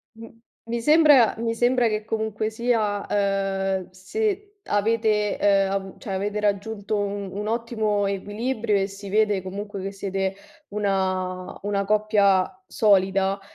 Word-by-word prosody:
M 225 0 -10 0.4
mi 235 0 -2
sembra 295 -4 +6
mi 230 0 -1
sembra 245 0 +3
che 215 0 -2
comunque 220 -1 -2
sia, 220 -3 0
uhm, 195 -2 0
se 410 - -3
avete, 210 0 +1
uhm, 195 -1 +3
avu 195 -1 -4
cioè, 200 -5 -6
avete 205 +2 -2
raggiunto 205 +1 -1
u 200 -1 -3
un 210 +1 -3
ottimo 220 -3 0
equilibrio 210 +3 -1
e 195 - 0
si 200 0 -9
vede 210 -2 +2
comunque 200 +1 -6
che 195 +1 -4
siete 195 -1 -2 0.3
una 185 -3 -2
una 200 -1 0
coppia 205 -3 +3 0.2
solida 195 -1 +2
205 Hz, 135 wpm, -24 LUFS, 195-220 Hz, 0.4 s, sembra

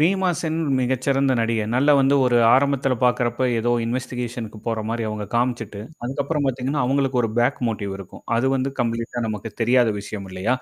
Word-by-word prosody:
ரீமாசென் 175 -2 +1 0.2
மிகச்சிறந்த 130 +2 +1
நடிகை. 115 -1 0
நல்ல 140 +4 +3
வந்து 135 +1 +3
ஒரு 125 -1 +3 0.2
ஆரம்பத்தில 135 -1 +2
பார்க்கறப்ப 125 0 +1
ஏதோ 120 +2 0 0.2
இன்வெஸ்டிகேஷன்க்கு 120 -2 -4
போற 115 -1 -1
மாரி 115 +1 -2
அவங்க 105 -1 -4
காமிச்சுட்டு 120 -4 -1 0.2
அதுக்கப்புறம் 140 +3 -1
பார்த்தீங்கன்னா, 135 +2 -1
அவங்களுக்கு 135 -1 +1
ஒரு 115 - -1
பேக் 120 - +2
மோட்டிவ் 100 -3 -3
இருக்கும். 95 - -12
அது 120 +3 +1
வந்து 135 +1 -1
கம்ப்ளீட்டா 115 0 -2
நமக்கு 110 +1 -5
தெரியாத 120 0 +4
விஷயம் 100 -1 -7
இல்லையா? 95 +8 0
125 Hz, 160 wpm, -22 LUFS, 115-135 Hz, 0.2 s, தெரியாத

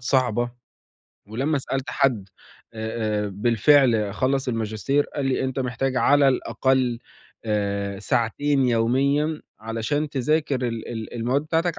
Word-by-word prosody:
صعبة. 120 -2 +1 0.8
ولمّا 135 +7 0
سألت 135 0 -3
حد 115 -8 +1 0.5
أ 110 -1 -2
أ - - -3
بالفعل 115 +1 +3
خلّص 130 +2 0
الماجستير 115 +5 0
قال 145 - -2
لي: 130 - 0
"أنت 130 0 -3
محتاج 130 +1 -1
على 140 +1 +5
الأقل 130 -2 +1 0.5
آآ 100 -2 -1
ساعتين 130 +5 +1
يوميًا 140 +7 +1 0.2
علشان 115 +7 -2
تذاكر 140 -2 0
ال 115 -1 -5
ال 110 -1 -6
المواد 125 +5 0
بتاعتك 165 +2 -1
125 Hz, 120 wpm, -24 LUFS, 110-140 Hz, 0.8 s, على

